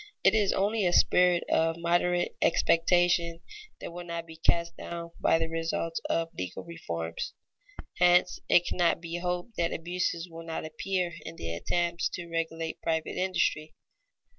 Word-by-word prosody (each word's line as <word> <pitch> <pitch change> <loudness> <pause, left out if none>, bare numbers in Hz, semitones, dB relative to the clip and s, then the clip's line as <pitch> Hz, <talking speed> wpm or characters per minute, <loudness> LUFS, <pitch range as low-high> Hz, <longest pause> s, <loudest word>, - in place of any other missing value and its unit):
It 195 - +6
is 210 -3 +3
only 205 0 +1
a 175 - +1
spirit 180 -1 +4
of 165 0 +2
moderate 175 +1 +1
expectation 170 0 +3 0.4
that - - -7
will 175 0 -6
not 170 -1 -5
be 160 -1 -11
cast 170 +1 +1
down 170 0 -6
by - - +4
the 165 0 -1
results 165 0 -2
of 165 0 0
legal 90 -1 -5
"reforms." 85 - -5 0.7
Hence 180 0 +4
it 175 - +5
cannot 175 -2 +1
be 170 0 -5
hoped 180 +4 -3
that 170 -1 +1
abuses 175 0 -2
will 165 -1 -9
not 165 -1 -4
appear 175 +3 -2
in 160 +1 -8
the 85 - -5
attempts 170 - 0
to 175 -1 -5
regulate 165 -1 -3
private 160 -1 -1
industry. 170 -4 0
170 Hz, 155 wpm, -29 LUFS, 165-175 Hz, 0.7 s, It